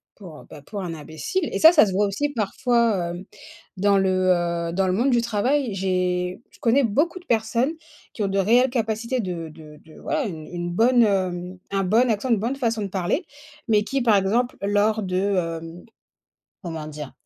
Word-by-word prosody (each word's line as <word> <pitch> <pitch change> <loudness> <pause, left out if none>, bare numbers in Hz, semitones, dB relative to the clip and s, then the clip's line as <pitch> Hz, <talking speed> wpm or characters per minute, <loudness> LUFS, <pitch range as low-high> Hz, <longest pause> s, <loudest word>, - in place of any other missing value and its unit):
pour, 175 -7 -12
heu, - - -15
bah, 145 - -12
pour 200 +5 -6
un 175 -3 -4
imbécile 160 - -4
et - - -2
ça 320 - +9
ça 320 -9 +6
se 195 - -3
voit 200 +2 +2
aussi, 290 +9 -1
parfois, 230 -5 0
hem, 175 +2 -8 0.5
dans 200 +1 +3
le, 190 - +2 0.2
heu, 170 -1 -2
dans 190 +1 +1
le 185 - +1
monde 245 +7 +2
du 240 -1 +3
travail. 235 +2 0
J'ai 180 0 -1
je - - -20
connais 250 +4 +3
beaucoup 295 - 0
de 355 - -20
personnes 235 +4 0 0.4
qui 215 - -3
ont - - +1
de 195 0 0
réelles 240 +7 +4
capacités 230 +1 -1
de 175 -6 -4
de 155 -1 -14
de 160 - -15
voilà, 310 -2 -1
une 160 -7 -6
une 175 0 -5
bonne, 240 +6 +4
hem, 185 -3 -1
un 195 0 0
bon 225 +7 +3
accent, 220 +4 -2
une 225 - +4
bonne 235 +6 -2
façon 230 -5 -1
de 200 - -2
parler, 190 - -1 0.4
mais 210 -2 +3
qui, 270 +5 -2
par 230 -3 +4
exemple, 220 +6 +1
lors 210 +2 +1
de, 185 -1 -2 0.4
hem, 165 +2 -11 0.8
comment 160 -3 -6
dire? 150 -2 -8
205 Hz, 200 wpm, -23 LUFS, 180-235 Hz, 0.8 s, ça